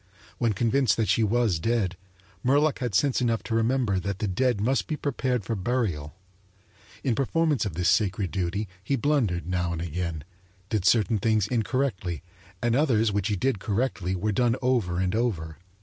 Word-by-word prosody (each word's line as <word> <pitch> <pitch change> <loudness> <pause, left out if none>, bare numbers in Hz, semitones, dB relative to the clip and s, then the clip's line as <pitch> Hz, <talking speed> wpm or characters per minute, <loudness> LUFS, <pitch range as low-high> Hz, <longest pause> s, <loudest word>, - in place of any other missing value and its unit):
When 115 -3 +2
convinced 120 +5 +2
that 110 -2 0
she - - +3
was 110 -5 +2
dead, 105 -2 0 0.5
Murlock 145 +3 +3
had 120 -6 -2
sense 135 +3 +2
enough 115 -2 0
to 115 - -4
remember 115 -3 +1
that 100 +1 -3
the 105 - -2
dead 120 +4 +1
must 115 0 +1
be 155 - -2
prepared 130 -6 -1
for 115 - -2
burial. 95 - -2 0.9
In 130 - +1
performance 145 +2 +1
of 85 - -6
this 90 0 0
sacred 100 -3 +1
duty 100 +2 -2 0.2
he 135 - 0
blundered 120 -10 +1
now 90 -1 -1
and 85 - -4
again, 85 -2 -3 0.5
did 105 -5 -1
certain 110 0 +3
things 110 -1 +2
incorrectly, 110 - -1 0.4
and 120 0 +2
others 115 -7 +3
which 100 0 0
he 105 - 0
did 120 +2 0
correctly 100 -3 -1
were 105 +4 -1
done 120 +2 +2
over 120 -9 +1
and 95 0 0
over. 90 -10 -2
110 Hz, 175 wpm, -26 LUFS, 95-125 Hz, 0.9 s, she